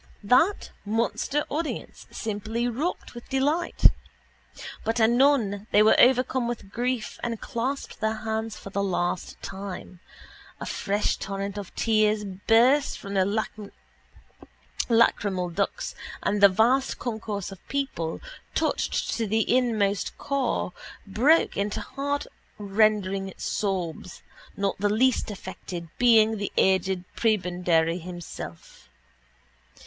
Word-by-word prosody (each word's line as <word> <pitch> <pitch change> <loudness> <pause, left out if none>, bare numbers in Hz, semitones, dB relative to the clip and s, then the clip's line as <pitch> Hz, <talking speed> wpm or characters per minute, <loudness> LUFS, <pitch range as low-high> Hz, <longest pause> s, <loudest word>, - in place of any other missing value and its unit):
That 260 - +3
monster 230 +7 0
audience 310 +2 -4
simply 220 +2 -3
rocked 280 +9 -3
with 240 0 -11
delight. 290 +6 0 1.0
But 225 +1 0
anon 225 -3 +3
they 210 - +5
were 215 - +6
overcome 255 0 +4
with 230 -5 -5
grief 245 0 -2
and 230 -2 -3
clasped 260 +3 -4
their 220 0 0
hands 220 0 -3
for 195 - -10
the 200 - -1
last 180 -2 -2
time. 190 -2 -7 0.6
A - - -5
fresh 205 +1 -1
torrent 195 0 -4
of 200 - -8
tears 215 -1 +2
burst 225 +8 +3
from 200 - -7
their 190 -1 +3 1.6
lachrymal 205 -6 +2
ducts 195 +4 -2 0.3
and 205 0 0
the 200 - +9
vast 235 +8 +2
concourse 220 -5 -4
of 195 - -13
people, 265 -13 -3 0.3
touched - - 0
to 225 -1 -1
the 220 +3 +2
inmost 215 -6 +1
core, 270 -9 -1 0.3
broke 260 +11 +3
into 200 +1 -1
heartrending 210 -8 -1
sobs, 185 -3 -3 0.3
not 200 -1 -1
the 205 +1 +2
least 240 +3 +2
affected 180 -4 -7
being 225 -2 +5
the 200 0 -3
aged 190 -1 +2
prebendary 180 -5 +1
himself. 175 - -9
215 Hz, 110 wpm, -26 LUFS, 195-240 Hz, 1.6 s, the